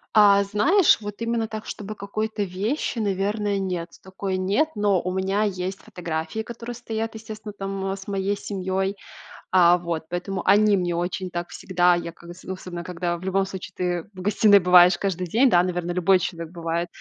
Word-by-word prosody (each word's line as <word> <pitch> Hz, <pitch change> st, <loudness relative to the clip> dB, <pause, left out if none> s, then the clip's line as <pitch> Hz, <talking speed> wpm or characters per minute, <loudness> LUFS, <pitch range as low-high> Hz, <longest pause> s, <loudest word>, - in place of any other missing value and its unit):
А, 200 Hz, -1 st, +7 dB
знаешь, 300 Hz, -, +4 dB
вот 205 Hz, -1 st, -6 dB
именно 230 Hz, -1 st, 0 dB
так, 215 Hz, 0 st, -7 dB
чтобы 215 Hz, +1 st, -6 dB
какой-то 215 Hz, +1 st, -3 dB
вещи, 205 Hz, -, -2 dB
наверное, 205 Hz, 0 st, 0 dB
нет. 180 Hz, -3 st, -3 dB
Такой 190 Hz, 0 st, -4 dB
нет, 200 Hz, +12 st, +1 dB
но 205 Hz, -3 st, +2 dB
у 185 Hz, -, -3 dB
меня 190 Hz, +3 st, 0 dB
есть 190 Hz, -1 st, -2 dB
фотографии, 165 Hz, +3 st, -5 dB
которые 235 Hz, +1 st, -7 dB
стоят, 225 Hz, -1 st, -4 dB
естественно, 215 Hz, -1 st, -8 dB
там 195 Hz, 0 st, -3 dB
с 195 Hz, 0 st, -7 dB
моей 200 Hz, 0 st, -1 dB
семьей. 190 Hz, 0 st, -2 dB, 0.6 s
А 175 Hz, -1 st, +6 dB
вот, 170 Hz, -2 st, -4 dB
поэтому 180 Hz, +2 st, -3 dB
они 210 Hz, 0 st, +5 dB
мне 175 Hz, -2 st, -1 dB
очень 180 Hz, +2 st, -2 dB
так 175 Hz, 0 st, -4 dB
всегда, 180 Hz, -1 st, +2 dB
я 170 Hz, -1 st, -4 dB
как 170 Hz, +1 st, -12 dB
з 185 Hz, -, -16 dB
особенно 180 Hz, -2 st, -6 dB
когда 175 Hz, -1 st, -2 dB
в 170 Hz, -, -12 dB
любом 190 Hz, +1 st, +1 dB
случае 190 Hz, -1 st, -8 dB
ты 180 Hz, +1 st, -2 dB
в 185 Hz, -, -9 dB
гостиной 205 Hz, +1 st, +5 dB
бываешь 180 Hz, 0 st, +6 dB
каждый 185 Hz, -2 st, -2 dB
день, 245 Hz, +9 st, +4 dB
да, 175 Hz, -3 st, +5 dB
наверно, 175 Hz, -1 st, -2 dB
любой 180 Hz, +1 st, +3 dB
человек 170 Hz, -1 st, -5 dB
бывает, 170 Hz, 0 st, -2 dB
190 Hz, 180 wpm, -24 LUFS, 180-205 Hz, 0.6 s, А